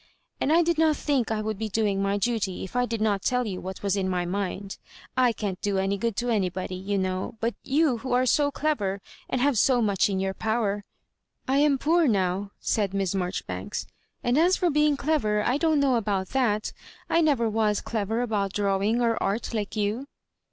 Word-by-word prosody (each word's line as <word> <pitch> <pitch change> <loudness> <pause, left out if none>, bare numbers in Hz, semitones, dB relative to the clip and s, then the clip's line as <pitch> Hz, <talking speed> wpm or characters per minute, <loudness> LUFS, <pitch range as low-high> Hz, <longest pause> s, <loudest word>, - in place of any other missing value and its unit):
and 290 - +1
I 335 +2 +5
did 335 -1 0
not 315 -2 +3
think 275 -6 0
I 215 -1 -1
would 215 -2 -3
be 220 -1 -2
doing 205 -2 0
my 200 +1 +1
duty 205 -3 -1
if 190 - -9
I 245 0 +2
did 230 -2 -3
not 205 -3 +1
tell 250 +3 +1
you 190 -4 -4
what 190 +2 -7
Was 200 -1 +1
in 190 -1 -1
my 180 -1 -1
mind. 195 +1 -4 0.3
/ 250 -3 +1
can't 195 -4 -3
do 200 -1 0
any 195 +1 +1
good 230 0 -1
to 245 +3 -1
anybody, 185 -3 -1
you 195 +2 -2
know; 185 +3 -2
but 230 +1 0
you 280 -3 +2
who 260 +3 -5
are 250 +1 +3
so 285 +3 +3
clever, 240 -11 -1 0.3
and 255 - 0
have 275 -4 +3
so 255 0 +4
much 205 -3 +2
in 190 -1 -1
your 190 0 -1
power 210 -2 -1 0.2
" - - -55
" - - -46
I 265 +1 +2
am 290 -2 +4
poor 325 +3 +3
now,*' 195 -2 0
said 200 -3 0
Miss 195 -2 0
Maijoribanks; 185 -1 -3 0.4
*'and 245 +4 +2
as 360 +3 +4
for 350 -2 +1
being 300 0 +3
clever, 215 -10 +1
I 250 +5 +1
don't 315 -1 +2
know 275 -2 +3
about 200 -5 0
that 225 -6 0 0.3
I 335 - +3
never 280 -8 +2
was 215 -1 +1
clever 220 +1 -2
about 205 -4 -1
drawing 205 +3 +1
or 230 -1 +1
Art 210 +5 -1
like 210 -2 -3
you." 215 +6 -1
220 Hz, 215 wpm, -26 LUFS, 195-255 Hz, 0.4 s, I